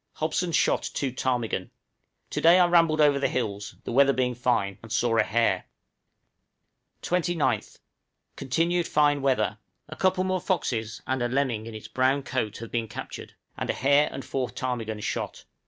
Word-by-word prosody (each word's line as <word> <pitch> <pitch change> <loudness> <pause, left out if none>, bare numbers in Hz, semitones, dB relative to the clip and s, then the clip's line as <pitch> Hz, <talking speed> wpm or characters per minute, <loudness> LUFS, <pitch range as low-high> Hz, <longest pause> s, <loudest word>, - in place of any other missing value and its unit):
Hobson 160 +3 -1
shot - - +2
three 135 -2 -1
ptarmigan. 125 -3 -1 0.6
To - - -2
day 170 +2 +7
I 180 - +6
rambled 165 -3 +4
over 145 -2 +5
the 140 - +2
hills, 105 -4 -3
the - - -5
weather 140 +2 +5
being 125 -1 0
fine, 115 -6 0
and 115 - -12
saw 115 +1 +1
a 115 - +5
hare. 115 +2 +1 1.4
29th. 165 - 0 0.6
Continued 170 +5 0
fine 145 -1 +3
weather. 130 -5 +1 0.3
A 155 - -8
couple 185 +1 +1
more 185 -1 -1
foxes 115 - -2
and 130 -1 -1
a 120 - +1
lemming 125 -4 -1
in 115 - -8
its 110 - -8
brown 130 +2 +1
coat 115 -6 -2
have 115 0 -8
been 115 -1 -1
captured, - - -8 0.2
and - - -4
a - - +2
hare 140 +2 +3
and 135 - -7
four 130 -2 -2
ptarmigan 115 -4 -4
shot. - - -4
130 Hz, 170 wpm, -26 LUFS, 115-155 Hz, 1.4 s, day